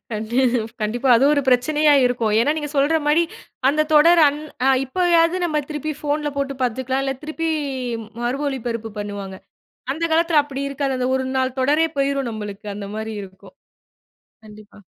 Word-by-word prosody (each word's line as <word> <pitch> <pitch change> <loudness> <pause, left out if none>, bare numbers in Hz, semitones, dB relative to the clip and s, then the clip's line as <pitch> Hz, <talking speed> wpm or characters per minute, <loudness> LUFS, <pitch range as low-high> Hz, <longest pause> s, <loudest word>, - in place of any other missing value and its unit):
கண் 215 0 -4 0.6
கண்டிப்பா. 240 +5 -1
அதுவும் 275 +5 +4
ஒரு 285 - +1
பிரச்சனையா 295 +4 +3
இருக்கும். 235 -3 0
ஏன்னா 290 +5 +2
நீங்க 295 -2 -4
சொல்ற 290 +4 +3
மாரி 310 +3 +4 0.5
அந்த 305 +2 +2
தொடர் 335 +3 +6
அன் 290 +1 -4 0.3
அ - - +5 0.2
இப்பயாவது 340 +3 +2
நம்ம 305 -3 0
திருப்பி 305 +1 -3
ஃபோன்ல 295 0 -1
போட்டு 275 0 -2
பாத்துக்கலாம். 260 +2 -1
இல்ல, 270 - -1
திருப்பி 320 +2 -3 0.7
மறு 250 +3 -1
ஒளிபரப்பு 230 -4 -4
பண்ணுவாங்க. 200 -2 -6 0.6
அந்த 325 +3 -5
காலத்தில 330 -2 +4
அப்படி 280 -1 -5
இருக்காது. 275 -1 -2
அந்த 250 - -1
ஒரு 260 - -1
நாள் 260 0 -1
தொடரே 300 +5 +3
போயிரும் 275 -2 0
நம்மளுக்கு 210 -1 -7
அந்த 200 -1 -6
மாரி 220 0 -4
இருக்கும். 190 -1 -15 0.9
கண்டிப்பா. 210 -1 -15
275 Hz, 155 wpm, -21 LUFS, 230-300 Hz, 0.9 s, தொடர்